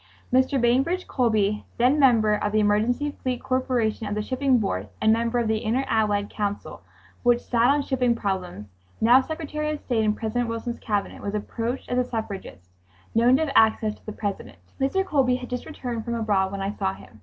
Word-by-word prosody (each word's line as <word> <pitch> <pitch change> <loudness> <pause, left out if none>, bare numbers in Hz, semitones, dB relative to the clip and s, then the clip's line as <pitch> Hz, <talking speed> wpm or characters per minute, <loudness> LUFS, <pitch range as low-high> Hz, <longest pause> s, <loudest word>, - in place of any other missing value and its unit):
Mr. 260 +1 +3
Bainbridge 270 +10 +2
Colby, 215 -5 +1
then 255 +5 +3
member 230 -6 +4
of 210 0 -1
the 215 - +2
Emergency 220 +7 +1
Fleet 255 -2 -2
Corporation 245 -4 0
of 205 - -2
the 210 - -1
Shipping 260 +2 +2
Board 100 - -2
and 220 - +4
member 230 +1 0
of 235 -2 +1
the 220 0 0
Inter 245 +5 0
Allied 210 -3 +1
Council 205 -1 -4 0.4
which 240 -1 +3
sat 240 -1 +1
on 285 +1 +3
shipping 250 -3 +1
problems, 185 - -3 0.3
now 245 +4 +6
Secretary 305 +1 -4
of 305 -1 -3
State 235 -6 0
in 210 0 +1
President 230 +2 -2
Wilson's 230 +1 -4
Cabinet, 205 -2 -2
was 200 +1 -3
approached 230 +4 -3
as 250 - 0
a - - +3
suffragist, 195 - -6 0.4
known 235 +3 +5
to 320 - +1
have 275 - -4
access 220 -1 +4
to - - -20
the - - -3
President. 205 - -5 0.2
Mr. 330 +9 +1
Colby 270 -7 +2
had 250 0 -7
just 250 - -4
returned 245 -7 -5
from 235 0 -3
abroad 205 -4 +1
when 200 0 -4
I 200 +1 -2
saw 95 - -2
him. 105 +2 -16
230 Hz, 200 wpm, -25 LUFS, 210-255 Hz, 0.4 s, now